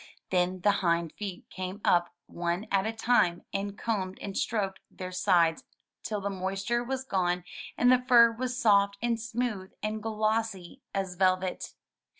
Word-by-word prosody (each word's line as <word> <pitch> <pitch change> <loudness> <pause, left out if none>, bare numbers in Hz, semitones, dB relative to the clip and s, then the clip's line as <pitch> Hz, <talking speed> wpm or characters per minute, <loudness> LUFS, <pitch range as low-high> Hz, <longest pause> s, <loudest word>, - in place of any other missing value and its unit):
Then 180 0 +1
the 205 - +5
hind 170 -2 +1
feet 195 -4 -7
came 185 +2 -5
up 175 0 +3
one 175 +3 -2
at 195 +1 +2
a - - 0
time 220 -6 +2
and 200 +1 -3
combed 190 -5 -2
and 195 -1 -6
stroked 200 -4 -1
their 185 -1 -7
sides 170 -2 +2 0.4
till 210 -2 -3
the 200 - -2
moisture 195 +5 -1
was 265 +1 -3
gone 180 -6 0 0.3
and 245 +1 +5
the 250 0 +4
fur 235 -2 +7
was 250 +2 -3
soft 200 -3 +4
and 235 -1 +1
smooth 225 -4 -3
and 215 0 -2
glossy 215 -3 -2
as 190 -2 -3
velvet. 185 0 0
195 Hz, 155 wpm, -29 LUFS, 185-225 Hz, 0.4 s, fur